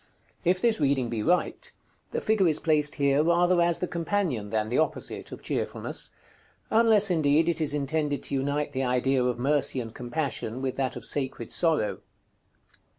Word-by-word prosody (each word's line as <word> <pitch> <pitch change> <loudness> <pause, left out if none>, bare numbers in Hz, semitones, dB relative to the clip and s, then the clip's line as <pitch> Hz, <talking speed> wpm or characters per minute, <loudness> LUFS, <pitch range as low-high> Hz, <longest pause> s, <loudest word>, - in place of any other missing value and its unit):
If 180 +1 +2
this 230 -1 +2
reading 135 -4 +1
be 115 -2 -2
right, 180 +11 0 0.4
the - - -3
figure 215 -4 +2
is 155 - +1
placed 150 -2 +1
here 140 0 +2
rather 175 +2 +3
as 170 -1 +2
the 180 - -2
companion, 170 - -2
than 110 0 -1
the 125 - +1
opposite, 155 - -2
of - - -9
Cheerfulness; - - -1 0.6
unless, 220 -3 +5
indeed, 155 -1 +3
it 170 -1 0
is 150 -1 +1
intended 145 0 -1
to - - -5
unite 145 +2 -1
the 135 -2 -2
idea 125 +1 +1
of 125 -1 0
Mercy 140 +1 +1
and 115 -2 -6
Compassion 125 -1 -3
with 130 -1 -3
that 135 -2 -1
of 120 -2 -7
Sacred 130 -4 -2
Sorrow. 160 -11 +1
145 Hz, 170 wpm, -27 LUFS, 130-170 Hz, 0.6 s, unless